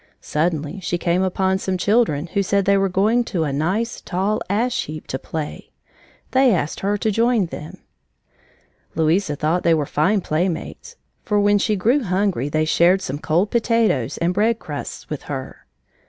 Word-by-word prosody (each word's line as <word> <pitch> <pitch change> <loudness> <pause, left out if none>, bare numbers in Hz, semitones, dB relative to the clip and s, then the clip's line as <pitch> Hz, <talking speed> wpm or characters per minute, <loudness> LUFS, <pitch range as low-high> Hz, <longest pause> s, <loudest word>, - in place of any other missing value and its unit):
Suddenly 155 +2 -2
she 175 -1 -2
came 175 +1 +1
upon 190 0 +1
some 190 -1 -2
children 190 -6 +2
who 200 - +2
said 200 0 +1
they 200 - +4
were 195 0 +2
going 215 +6 +2
to 175 -8 -1
a 145 -3 -2
nice, 190 +11 -1
tall 195 +4 -1
ash 240 +5 0
heap 155 0 -8
to 130 - -4
play. 155 +1 -6 0.6
They 260 -5 +4
asked 155 -2 -2
her 205 +1 0
to 215 +1 0
join 230 -1 +2
them. 155 -2 -8 1.2
Louisa 160 0 +1
thought 160 +4 0
they 165 -1 +3
were 150 -2 0
fine 190 +9 +1
playmates, 175 - -3 0.3
for 210 -3 0
when 205 0 +3
she 215 +1 +1
grew 235 +9 +2
hungry 185 - 0
they 155 +1 +1
shared 175 +4 +3
some 140 -1 -4
cold 170 +7 +1
potatoes 230 - +1
and 170 +1 0
bread 220 +4 +2
crusts 150 -9 -7
with 150 - -5
her. 135 -2 -6
185 Hz, 170 wpm, -21 LUFS, 155-210 Hz, 1.2 s, they